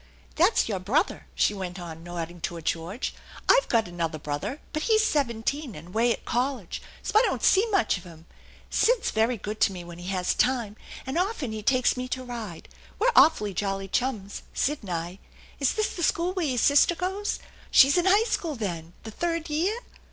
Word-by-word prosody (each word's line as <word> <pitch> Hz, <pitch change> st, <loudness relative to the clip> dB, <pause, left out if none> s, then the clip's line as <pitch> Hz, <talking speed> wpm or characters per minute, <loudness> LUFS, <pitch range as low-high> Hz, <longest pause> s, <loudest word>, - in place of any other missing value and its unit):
" -, -, -29 dB
That's 360 Hz, +8 st, +3 dB
your 200 Hz, -4 st, -2 dB
brother," 235 Hz, -, 0 dB
she -, -, +3 dB
went 185 Hz, -2 st, -5 dB
on, 165 Hz, -2 st, -8 dB
nodding 175 Hz, 0 st, -6 dB
toward 165 Hz, -1 st, -4 dB
George. 170 Hz, +9 st, -2 dB, 0.2 s
" -, -, -16 dB
I've -, -, +5 dB
got 225 Hz, -4 st, +2 dB
another 170 Hz, -2 st, -3 dB
brother, 145 Hz, -, -4 dB
but 305 Hz, -, -1 dB
he's 435 Hz, -1 st, +5 dB
seventeen 275 Hz, -, -1 dB
and 165 Hz, +3 st, -10 dB
away 230 Hz, +5 st, +2 dB
at -, -, -3 dB
college, 245 Hz, -6 st, -2 dB, 0.2 s
so 425 Hz, -, +4 dB
I -, -, +5 dB
don't -, -, 0 dB
see 395 Hz, +4 st, +5 dB
much 390 Hz, -, +2 dB
of -, -, -15 dB
him. 165 Hz, -2 st, -13 dB, 0.5 s
Sid's 460 Hz, +2 st, +2 dB
very 225 Hz, +2 st, +1 dB
good 210 Hz, +2 st, -6 dB
to -, -, +5 dB
me 180 Hz, -2 st, -7 dB
when 170 Hz, 0 st, -10 dB
he 175 Hz, -, -8 dB
has 185 Hz, -2 st, 0 dB
time, 240 Hz, -5 st, +1 dB, 0.3 s
and 265 Hz, +6 st, -1 dB
often 360 Hz, -, -1 dB
he 215 Hz, 0 st, -4 dB
takes 255 Hz, +3 st, +3 dB
me 250 Hz, 0 st, -3 dB
to 255 Hz, 0 st, -3 dB
ride. 230 Hz, -8 st, -7 dB, 0.3 s
We're -, -, +3 dB
awfully 210 Hz, -11 st, +5 dB
jolly 195 Hz, +1 st, -2 dB
chums, 205 Hz, -2 st, -2 dB
Sid 295 Hz, +2 st, 0 dB
and 205 Hz, -, -10 dB
I. 175 Hz, +2 st, -4 dB, 0.4 s
Is 275 Hz, -3 st, +2 dB
this 430 Hz, -1 st, -1 dB
the 345 Hz, -, -5 dB
school 340 Hz, +2 st, +1 dB
where 365 Hz, -5 st, -1 dB
your 255 Hz, -2 st, -1 dB
sister 285 Hz, +7 st, +5 dB
goes? 380 Hz, +4 st, -2 dB, 0.3 s
She's 275 Hz, +2 st, +7 dB
in 355 Hz, 0 st, +2 dB
high 400 Hz, +3 st, +5 dB
school, 335 Hz, -9 st, -2 dB
then. 175 Hz, -7 st, -4 dB
The 220 Hz, -, -7 dB
third 335 Hz, +4 st, -2 dB
year? 380 Hz, +10 st, 0 dB
235 Hz, 205 wpm, -26 LUFS, -, 0.5 s, She's